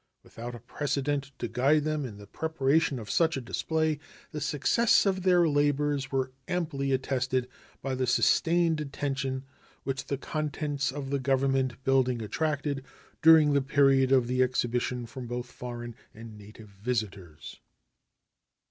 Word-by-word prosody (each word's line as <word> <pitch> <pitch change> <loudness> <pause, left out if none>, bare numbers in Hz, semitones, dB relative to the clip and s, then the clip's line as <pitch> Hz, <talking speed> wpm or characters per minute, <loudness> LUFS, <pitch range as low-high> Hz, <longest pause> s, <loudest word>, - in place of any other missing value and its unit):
Without 120 +1 -8
a - - -9
precedent 140 +3 -2
to 120 - -3
guide 135 +6 +2
them 155 -2 -1
in 105 -4 -10
the 100 - -11
preparation 150 +2 0
of 110 -3 -7
such 165 -3 +2
a - - -1
display, 155 +4 -1 0.3
the 150 - -5
success 155 - +3
of 190 -1 +1
their 180 -2 +4
labors 145 -2 +1
was 130 -1 0 0.2
amply 155 -6 -1
attested 130 -1 0 0.4
by 135 0 -2
the 130 0 -1
sustained 165 +5 +3
attention 135 -2 -3 0.4
which 135 -1 -3
the 140 - -2
contents 145 -1 -2
of 135 -1 -6
the 140 - +1
Government 135 -1 0
building 130 -2 +2
attracted 145 +4 -2 0.4
during 160 -2 +7
the 140 - +3
period 135 -1 +3
of 130 -3 +5
the 125 +1 0
exhibition 125 -1 0
from 125 +1 -8
both 120 +1 -4
foreign 120 -1 -7 0.2
and 110 0 -10
native 105 +1 -13
visitors. 100 -6 -5
135 Hz, 145 wpm, -28 LUFS, 125-150 Hz, 0.4 s, during